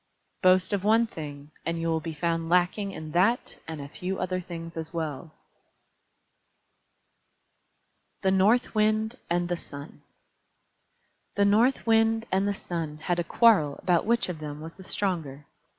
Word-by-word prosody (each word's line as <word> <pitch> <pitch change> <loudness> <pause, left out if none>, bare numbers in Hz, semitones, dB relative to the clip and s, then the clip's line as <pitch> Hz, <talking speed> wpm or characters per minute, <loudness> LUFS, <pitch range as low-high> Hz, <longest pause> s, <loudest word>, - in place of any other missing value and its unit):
Boast 185 +1 +4
of 195 -2 0
one 225 +3 +4
thing 145 -7 -8
and 165 0 -2
you 165 - -2
will 160 -1 +1
be 165 +1 -5
found 165 +1 -1
lacking 180 +3 +2
in 155 -4 -7
that 195 +9 +1
and 160 -2 -6
a 140 - -6
few 185 +6 -4
other 185 0 -2
things 165 -1 -8
as 160 0 -5
well. 160 -2 -4 2.9
THE 190 - +3
NORTH 205 +6 +3
WIND 215 +2 +1
AND 175 0 +1
THE 175 0 -1
SUN 140 -1 -10 1.3
The 200 - +3
North 225 +6 +3
Wind 225 0 +3
and 190 +2 +2
the 205 - 0
Sun 165 -5 -4
had 175 +3 -1
a - - +1
quarrel 165 -7 +4
about 175 +1 +1
which 235 +1 +2
of 175 -4 -5
them 150 -1 -6
was 160 +2 -8
the 190 - -13
stronger. 160 -8 -3
175 Hz, 155 wpm, -27 LUFS, 160-205 Hz, 2.9 s, Boast